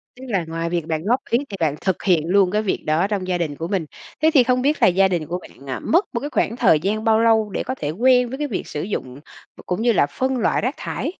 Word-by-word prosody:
Tức 260 +1 -11
là 195 -7 0
ngoài 165 +1 -3
việc 170 -2 -2
bạn 160 0 -2
góp 245 +4 +2
ý 235 - +3
thì 195 - -6
bạn 150 -3 +1
thực 190 -2 -1
hiện 170 -4 +2
luôn 190 0 +3
cái 210 +1 +1
việc 205 - -2
đó 160 +5 +1
trong 195 -3 -3
gia 180 -1 0
đình 155 -4 -3
của 165 +3 -5
mình. 190 -5 -1 0.4
Thế 315 +1 +4
thì 260 -4 +6
không 250 +1 +1
biết 295 +3 0
là - - +7
gia 190 +2 +4
đình 170 -5 -2
của 180 +2 -3
bạn, 140 -5 -15
à, 130 - -3
mất 350 +6 +2
một 235 - -1
cái 290 +3 -5
khoảng 230 - 0
thời 155 -10 +4
gian 210 +5 -2
bao 220 0 +3
lâu 220 -2 +3
để - - -3
có 260 - -4
thể 145 - -4
quen 250 +7 +3
với 265 - -5
cái 295 0 -2
việc 215 - -4
sử 150 - -4
dụng 130 -10 -4 0.4
v - - -19
cũng 180 +5 -2
như 240 0 +3
là 145 - +3
phân 260 0 -2
loại 230 - +1
rác 255 +5 -1
thải? - - -4
195 Hz, 295 wpm, -21 LUFS, 170-245 Hz, 0.4 s, là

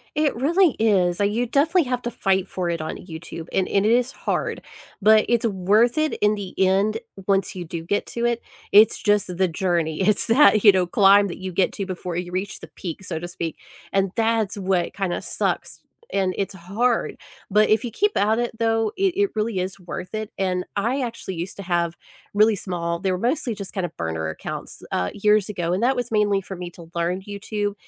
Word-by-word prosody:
It 300 -3 +1
really 335 +7 +3
is, 185 -5 +2
like, 205 0 +2
you 240 +3 0
definitely 310 +8 +3
have 250 -2 -2
to 240 - -3
fight 190 -1 0
for 180 -2 -3
it 170 -2 -2
on 155 - -4
YouTube, 165 -1 -8
and 190 - +1
and 200 +1 +1
it 220 - +4
is 245 +2 +2
hard, - - -2 0.4
but 215 +1 +6
it's 235 -1 +2
worth 210 - +2
it 310 0 +1
in 210 0 +4
the 195 -3 -7
end 195 +4 +2 0.3
once 195 -1 +1
you 180 - -4
do 165 0 -6
get 205 +3 0
to 235 0 -2
it. 235 0 0 0.3
It's 215 +2 +7
just 205 -4 +1
the 190 - +3
journey, 170 -1 -1
it's 205 +2 +2
that, 225 -3 +5
you 205 - +9
know, 185 -2 +1
climb 200 +2 +5
that 180 - -6
you 190 0 -5
get 180 +2 +1
to 195 - -4
before 180 -2 -5
you 180 0 -4
reach 190 +2 -3
the - - -10
peak, 175 +1 -6
so 170 -3 -4
to 175 - -6
speak, 170 -2 -5 0.4
and 195 -1 +2
that's 225 -3 +1
what 185 -3 0
kinda 190 -2 -2
sucks, - - -2 0.3
and 190 -2 +1
it's 195 -1 -2
hard. 220 +7 -1 0.3
But 215 +2 +4
if 215 0 +3
you 235 - -4
keep 415 - +1
at 215 +3 +2
it, 240 -1 -2
though, 225 -1 +1
it 385 -2 +2
it 405 0 +2
really 215 -2 -1
is 190 +2 -4
worth 180 +2 -7
it, 215 -1 -4
and 180 -1 -1
I 235 +7 0
actually 230 -6 -5
used 170 +3 -5
to 200 - -6
have 170 -2 0 0.4
really 215 +1 +4
small 170 -3 -3
they 190 0 0
were 180 - 0
mostly 250 - 0
just 200 -2 -7
kinda 180 -4 -2
burner 80 -1 -2
accounts, 80 - -7
uh, 90 0 -1
years 210 0 +2
ago, 175 -4 -2
and 195 - 0
that 260 +2 +3
was 245 -2 -3
mainly 205 -2 +2
for 190 0 -8
me 175 0 -6
to 170 -1 -13
learn 175 +2 -1
YouTube 205 +1 -3
200 Hz, 215 wpm, -23 LUFS, 180-225 Hz, 0.4 s, you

